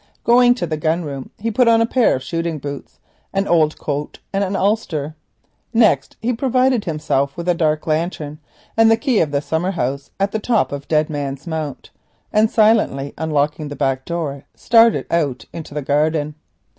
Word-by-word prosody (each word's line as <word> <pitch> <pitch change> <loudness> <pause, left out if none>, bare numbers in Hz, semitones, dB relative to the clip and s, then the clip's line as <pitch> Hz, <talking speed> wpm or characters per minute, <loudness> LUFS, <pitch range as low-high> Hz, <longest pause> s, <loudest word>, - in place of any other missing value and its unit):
Going 245 +1 +5
to 245 - -2
the 155 -2 -3
gun 160 +2 0
room 140 -2 -6
he 230 +2 -2
put 245 +3 +3
on 230 -1 +5
a 230 - +4
pair 245 0 +2
of 130 - -5
shooting 165 +3 -2
boots, 140 0 -7 0.4
an 195 0 0
old 155 -3 +3
coat, 145 0 -4 0.2
and 195 +1 +1
an 195 0 -2
ulster. 185 -8 -1 0.6
Next 215 - +3
he 245 +2 +1
provided 255 -1 +1
himself 150 -4 -1
with 170 0 -5
a 175 - +4
dark 155 -2 0
lantern 155 -2 -2 0.4
and 225 0 +5
the 225 - +5
key 245 -1 +1
of 155 - +2
the 140 0 -1
summer 160 +4 -1
house 140 -5 -3
at 195 +1 +1
the 220 - -1
top 225 0 +1
of 140 0 -6
Dead 155 -1 +2
Man's 140 -2 -4
Mount, 160 -4 -5 0.4
and 215 +1 +4
silently 215 -12 +2
unlocking 150 -1 -1
the 145 - -6
back 135 -2 -1
door 150 -5 -4
started 230 -1 +4
out 145 -7 0
into 160 -3 -8
the 150 - -2
garden. 150 +2 +1
160 Hz, 185 wpm, -19 LUFS, 145-215 Hz, 0.6 s, Going